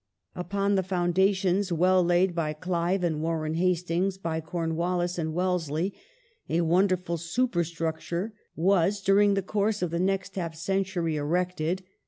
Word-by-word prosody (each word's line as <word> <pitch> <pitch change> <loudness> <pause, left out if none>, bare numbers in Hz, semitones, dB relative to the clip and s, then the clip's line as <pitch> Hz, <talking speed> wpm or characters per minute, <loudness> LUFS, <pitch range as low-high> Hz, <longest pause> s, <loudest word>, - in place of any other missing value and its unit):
Consoli - - -4
Upon 200 +2 0
the 195 - +3
foundations 185 +1 +1
well 180 +2 +4
laid 175 +1 +3
by 160 -3 -1
Clive 180 +3 -1
and 160 -3 0
Warren 160 -1 -1
Hastings, 180 +2 0
dationof 170 -4 -3
\yy 160 - -1
Cornwallis 175 +2 -1
and 160 -1 -1
Wellesley, 180 0 0 0.6
a 165 +2 +2
wonderful 180 0 +2
supei'structure 170 -1 -2 0.2
was, 190 +2 +3
India, 195 - -13
during 200 +1 +5
the 195 - 0
course 210 +1 0
of 175 - -1
the 170 - -1
next 195 +1 -1
half 170 -3 -3
century, 175 -2 -1
erected. 175 +3 -1
180 Hz, 150 wpm, -27 LUFS, 165-190 Hz, 0.6 s, during